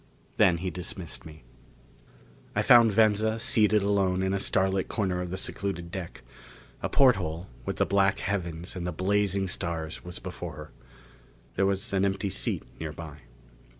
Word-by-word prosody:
Then 95 -5 +5
he 90 +2 -3
dismissed 90 -1 -6
me. 80 -4 -13 1.1
I - - +2
found 115 -2 +7
Venza 110 +1 +3
seated 105 -2 +3
alone 95 -2 +1
in 95 0 0
a 100 - 0
starlit 95 0 +1
corner 95 -5 -1
of 90 - -4
the 95 - -4
secluded 85 -3 -3
deck. 95 -3 -7 0.6
A - - -2
porthole, 95 - +2 0.2
with - - -1
the - - +2
black 100 +1 +2
heavens 90 -3 -3
and 90 -1 -4
the - - -1
blazing 100 0 +1
stars 85 -3 -4
was 90 -1 -7
before - - -7
her. 75 +1 -10 0.8
There 95 +1 +2
was 100 0 -1
an 95 0 +2
empty 100 0 0
seat - - -1 0.2
nearby. 80 -1 -7
95 Hz, 155 wpm, -28 LUFS, 85-100 Hz, 1.1 s, found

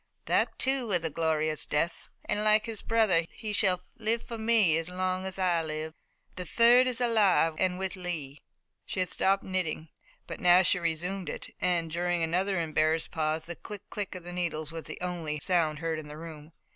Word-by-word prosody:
That, - - +1
too, 265 -2 0
was 180 -5 +1
a 165 - -2
glorious 155 -1 0
death, 165 +3 -1 0.2
and 210 - 0
like 215 0 +4
his 225 -3 -4
brother 215 -7 +3
he 215 -2 -6
shall 185 -3 +2 0.2
live 225 +1 0
for 230 -1 -7
me 220 -7 +3
as 165 +1 -4
long 185 +1 -2
as 190 - -5
I 180 -3 +2
live. 155 0 -4 0.4
The 180 - -3
third 240 +7 +5
is 250 -1 0
alive 210 -9 +3
and 180 -1 +1
with 190 -1 -3
Lee." 160 -6 -5 0.4
She - - -5
had 185 -1 0
stopped 195 +2 +2
knitting, 165 -4 -2 0.4
but - - -7
now 180 +1 +6
she 180 - +2
resumed 175 +3 -2
it, - - -7
and, 170 -2 0
during 175 0 0
another 185 +3 0
embarrassed 155 0 +1
pause, 155 0 -1
the 170 - -6
click, 205 +2 -9
click 205 -2 -4
of 180 - -7
the 175 +1 -7
needles 160 -3 -3
was 165 -1 -7
the - - -7
only 170 -4 -3
sound 160 -2 +1
heard 165 0 -2
in 155 - -9
the 150 +1 -9
room. 155 -1 -10
180 Hz, 195 wpm, -29 LUFS, 160-195 Hz, 0.4 s, now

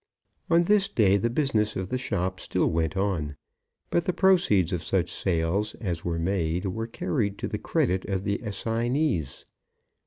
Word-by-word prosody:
On 170 +1 +5
this 200 +2 +3
day 100 -4 +3
the 115 +4 0
business 115 -5 +1
of 95 0 -3
the 130 - -1
shop 95 -6 -2
still - - 0
went 80 +3 -1
on, 90 -7 -1 0.6
but 170 - +1
the 180 - 0
proceeds 170 - +3
of 85 -2 -2
such - - 0
sales 95 +5 0
as 90 -7 -4
were 85 -1 -1
made 85 0 -1
were 110 +4 -3
carried 110 -4 -2
to - - -3
the - - -4
credit 95 +1 0
of 95 -1 -1
the 100 0 -1
assignees. 115 - -1
100 Hz, 165 wpm, -26 LUFS, 90-120 Hz, 0.6 s, On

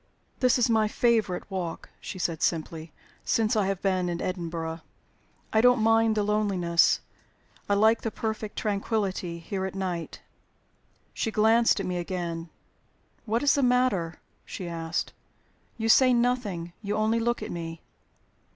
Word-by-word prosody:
"This 255 -1 +4
is 245 - +3
my 220 -2 +3
favorite 220 -5 +1
walk," 180 -3 -5
she - - -7
said, 165 -3 -2
simply, 160 -1 -2 0.3
"since 225 -1 +1
I 205 -3 +2
have 195 -1 -2
been 185 -2 +1
in 170 -1 -3
Edinburgh. 165 -3 -4 0.7
I 220 - +5
don't 245 +1 +5
mind 225 0 +3
the 210 - +1
loneliness. 195 -5 +2 0.7
I 200 - +4
like 220 +3 +4
the 225 - -2
perfect 220 -1 -4
tranquillity 200 -4 -1
here 190 +3 -4
at 190 0 -4
night." 180 -4 -4 0.9
She - - -1
glanced 225 +1 +4
at 195 - -2
me 180 -1 -2
again. 170 -2 -4 0.8
"What 230 +3 0
is 285 - +5
the 285 - +2
matter?" 245 -10 +1 0.2
she 180 - -7
asked. 165 0 -3 0.6
"You 225 -1 -2
say 255 +2 +6
nothing; 225 -9 -1
you 205 -1 -2
only 220 +2 +1
look 240 +1 -1
at - - -6
me." 165 -1 -6
200 Hz, 150 wpm, -27 LUFS, 175-225 Hz, 0.9 s, say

